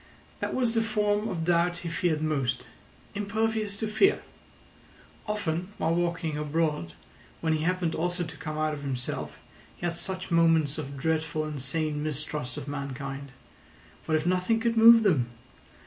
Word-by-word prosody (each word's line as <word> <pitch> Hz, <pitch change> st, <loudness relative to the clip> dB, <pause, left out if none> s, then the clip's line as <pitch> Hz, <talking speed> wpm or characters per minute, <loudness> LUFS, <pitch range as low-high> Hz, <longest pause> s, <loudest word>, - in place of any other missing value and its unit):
That -, -, -2 dB
was 245 Hz, -3 st, +1 dB
the 225 Hz, -, +3 dB
form 210 Hz, -1 st, +1 dB
of 165 Hz, -5 st, -2 dB
doubt 175 Hz, +1 st, +2 dB
he -, -, -1 dB
feared 165 Hz, -2 st, 0 dB
most. 135 Hz, -5 st, 0 dB, 0.5 s
Impervious 215 Hz, 0 st, -1 dB
to 220 Hz, -, -2 dB
fear! 385 Hz, -, +3 dB, 1.0 s
Often 180 Hz, -5 st, -1 dB
while 165 Hz, +1 st, +1 dB
walking 165 Hz, -3 st, -1 dB
abroad, 150 Hz, -, -1 dB, 0.5 s
when 160 Hz, -1 st, +1 dB
he 155 Hz, 0 st, 0 dB
happened 180 Hz, -2 st, +1 dB
also 175 Hz, +2 st, -1 dB
to 160 Hz, -1 st, -8 dB
come 155 Hz, -1 st, -5 dB
out 155 Hz, 0 st, +1 dB
of 145 Hz, -, -6 dB
himself, 130 Hz, -3 st, -4 dB, 0.4 s
he -, -, -5 dB
had 170 Hz, -1 st, -1 dB
such 185 Hz, +1 st, -4 dB
moments 165 Hz, -3 st, +4 dB
of 140 Hz, +1 st, -6 dB
dreadful 155 Hz, +1 st, 0 dB
and 150 Hz, -3 st, -3 dB
sane 150 Hz, +2 st, -1 dB
mistrust 150 Hz, -3 st, -3 dB
of 135 Hz, -, -6 dB
mankind. 140 Hz, -1 st, -5 dB, 0.8 s
What 155 Hz, -, +3 dB
if 155 Hz, -, -3 dB
nothing 185 Hz, +5 st, +2 dB
could 230 Hz, 0 st, +1 dB
move 230 Hz, 0 st, +9 dB
them? 150 Hz, -, +3 dB
165 Hz, 160 wpm, -28 LUFS, 150-190 Hz, 1.0 s, move